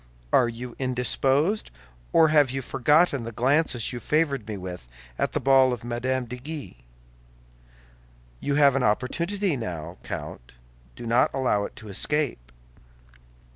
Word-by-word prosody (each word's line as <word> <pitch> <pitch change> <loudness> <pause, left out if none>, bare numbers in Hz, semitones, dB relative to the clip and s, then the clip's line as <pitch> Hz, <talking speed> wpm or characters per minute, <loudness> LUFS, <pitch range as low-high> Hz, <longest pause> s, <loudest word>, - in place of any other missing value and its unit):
Are 120 - +5
you 120 +1 -8
indisposed, 135 - +1 0.4
or 160 -1 +5
have 150 -3 +4
you 135 +1 -3
forgotten 140 +2 +2
the 115 - -6
glances 130 0 +1
you 120 - -4
favored 140 -3 0
me 105 -2 -4
with 90 -9 -8 0.3
at - - 0
the - - 0
ball 135 -1 +5
of 120 - -6
Mme. 125 +2 -2
de 125 +1 -7
Guise? 140 - -7 1.7
You 140 - -1
have 140 -2 +5
an 135 - +1
opportunity 170 - 0
now, 85 - -6
Count; - - -7 0.4
do - - -9
not 120 +2 +3
allow 125 -6 +1
it - - -9
to 110 - -11
escape." 110 - -1
130 Hz, 140 wpm, -25 LUFS, 115-145 Hz, 1.7 s, Are